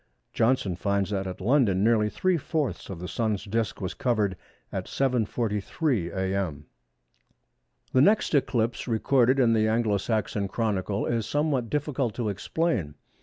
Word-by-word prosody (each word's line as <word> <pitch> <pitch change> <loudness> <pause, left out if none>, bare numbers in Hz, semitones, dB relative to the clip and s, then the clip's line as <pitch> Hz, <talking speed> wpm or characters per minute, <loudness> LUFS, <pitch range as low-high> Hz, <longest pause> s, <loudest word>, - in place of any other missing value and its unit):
Johnson 115 -6 +1
finds 100 +2 -1
that 95 -1 -1
at 90 - -6
London 105 -3 +3
nearly 110 -1 +3
three 185 +10 +1
fourths 155 -2 -2
of 95 - -5
the 90 +2 -6
Sun's 110 -2 -1
disc 110 +2 -2
was 95 -2 -3
covered 105 -6 0 0.4
at - - -4
7.43 115 - 0
a.m. 95 -6 -2 1.3
The 130 - +5
next 205 +5 +3
eclipse 120 -5 +1
recorded 125 +3 +3
in 120 -3 +4
the 110 -1 +3
Anglo 110 -2 +2
Saxon 105 -1 -1
Chronicle 100 -2 -1
is 115 -2 -1
somewhat 145 -6 0
difficult 140 -6 -1
to 115 -4 -1
explain. 100 - -1
110 Hz, 140 wpm, -27 LUFS, 100-130 Hz, 1.3 s, The